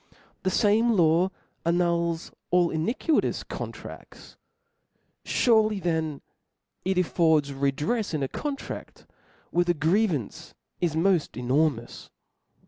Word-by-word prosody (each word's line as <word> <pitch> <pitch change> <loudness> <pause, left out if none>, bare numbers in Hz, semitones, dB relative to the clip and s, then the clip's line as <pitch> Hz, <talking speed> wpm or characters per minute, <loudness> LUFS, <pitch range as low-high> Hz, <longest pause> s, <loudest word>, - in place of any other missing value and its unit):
The 190 - 0
fame 220 +4 +3
law 170 -1 +3 0.3
annuls 170 -1 0 0.2
all 175 -1 +3
iniquitous 230 - 0
contradts; - - -9 0.9
furely 220 -3 +3
then 160 -5 -1 0.6
it 190 0 0
affords 160 -5 +2
redrefs 145 - -1
in 155 -4 -1
a - - 0
con 290 - -3
tract - - -9 0.5
where 175 +1 +2
the 175 0 +1
grievance 160 - 0 0.2
is 170 -3 0
moft 170 -3 +1
enormous. 125 -1 -1
170 Hz, 105 wpm, -26 LUFS, 155-195 Hz, 0.9 s, fame